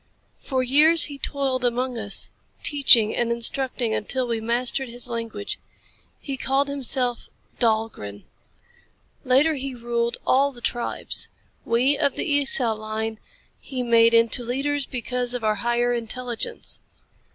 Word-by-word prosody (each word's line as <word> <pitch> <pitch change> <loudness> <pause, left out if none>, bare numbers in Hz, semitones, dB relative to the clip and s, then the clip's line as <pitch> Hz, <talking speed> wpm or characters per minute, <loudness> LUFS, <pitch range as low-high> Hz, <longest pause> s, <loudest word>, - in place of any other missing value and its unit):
For 260 -2 -1
years 300 +5 +6
he 285 -1 -2
toiled 270 -3 -1
among 245 +1 0
us, 210 -3 0 0.3
teaching 245 -7 +4
and 235 -1 0
instructing 235 0 -2
until 255 +5 -1
we 230 -2 -2
mastered 245 +3 -1
his 245 +1 -3
language. 230 -3 -5 0.6
He 275 -2 -5
called 270 +2 +1
himself 255 -3 -1 0.3
Dahlgren. 220 - -1 1.0
Later 275 +5 +4
he 270 -2 -4
ruled 235 0 -2
all 275 +2 +3
the 245 - -13
tribes. 240 0 0 0.4
We 250 +5 +2
of 285 -3 +1
the - - -2
Esau 275 -5 +2
line 220 0 -4 0.4
he 255 -3 -5
made 230 -1 +5
into 230 +1 +3
leaders 275 +4 -1
because 250 0 -3
of 245 - -4
our 215 -1 +1
higher 240 0 +1
intelligence. 240 - -4
245 Hz, 130 wpm, -24 LUFS, 230-270 Hz, 1.0 s, years